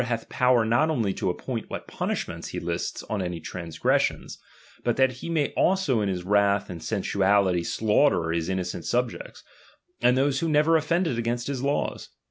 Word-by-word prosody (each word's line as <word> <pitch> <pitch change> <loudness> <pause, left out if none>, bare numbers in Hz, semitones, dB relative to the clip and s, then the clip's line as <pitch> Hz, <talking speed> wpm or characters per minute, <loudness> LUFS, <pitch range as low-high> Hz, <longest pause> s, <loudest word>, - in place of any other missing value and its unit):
jjath 115 -2 -3
power 125 -2 +3
not 120 +8 +2
only 115 -11 0
to - - -2
appoint - - -4
what - - -6
punishments - - -3
he - - -5
lists 85 0 -3
on 105 -3 -3
any 90 -2 -3
transgressions, 80 0 -1 0.4
but 120 - 0
that 130 -1 +4
he 130 +6 -8
may 155 -4 +1
also 175 - +2
in 100 - 0
his 90 -2 -3
wrath 100 0 +2
and 85 -2 -7
sensuality 100 -3 +1
slaughter 105 - +2
his 80 +1 -1
in 95 - 0
nocent 90 -2 -4
subjects, 120 +10 -2 0.6
and 125 +1 +4
those 135 0 +2
who 165 - -1
never 155 +2 +4
offended 160 -4 +1
against 120 +1 -2
the 140 - -2
laws. 140 +2 -2
115 Hz, 175 wpm, -26 LUFS, 95-135 Hz, 0.6 s, that